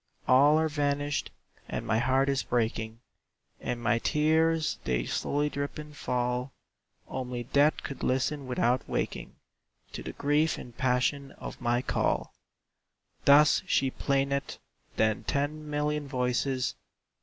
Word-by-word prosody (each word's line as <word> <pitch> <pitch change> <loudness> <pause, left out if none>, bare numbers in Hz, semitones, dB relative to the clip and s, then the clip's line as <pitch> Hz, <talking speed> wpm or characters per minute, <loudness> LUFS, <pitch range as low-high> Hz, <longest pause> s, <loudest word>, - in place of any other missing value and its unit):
"All 145 +4 +6
are 160 0 +2
vanished, 145 -1 -1 0.4
and - - -3
my 110 -1 +1
heart 130 +3 +2
is 135 -1 +1
breaking; 115 -1 -2 0.6
And 125 -1 -3
my 120 0 +1
tears 160 +3 +2
they - - 0
slowly 145 - 0
drip 140 0 -4
and 150 -1 -9
fall; 125 0 -2 0.5
Only 125 -2 -4
death 145 +5 +2
could 140 - -6
listen 135 +2 0
without 125 0 +1
waking - - -3 0.6
To - - -6
the - - -6
grief 150 +3 +1
and 120 -2 -10
passion 130 +2 0
of - - -9
my 120 0 +1
call!" - - 0 0.9
Thus 145 +2 +6
she 135 -1 +2
plaineth. 140 0 -1 0.4
Then 110 -1 +1
ten 150 +1 -2
million 150 0 -1
voices. 125 0 0
135 Hz, 130 wpm, -29 LUFS, 125-145 Hz, 0.9 s, All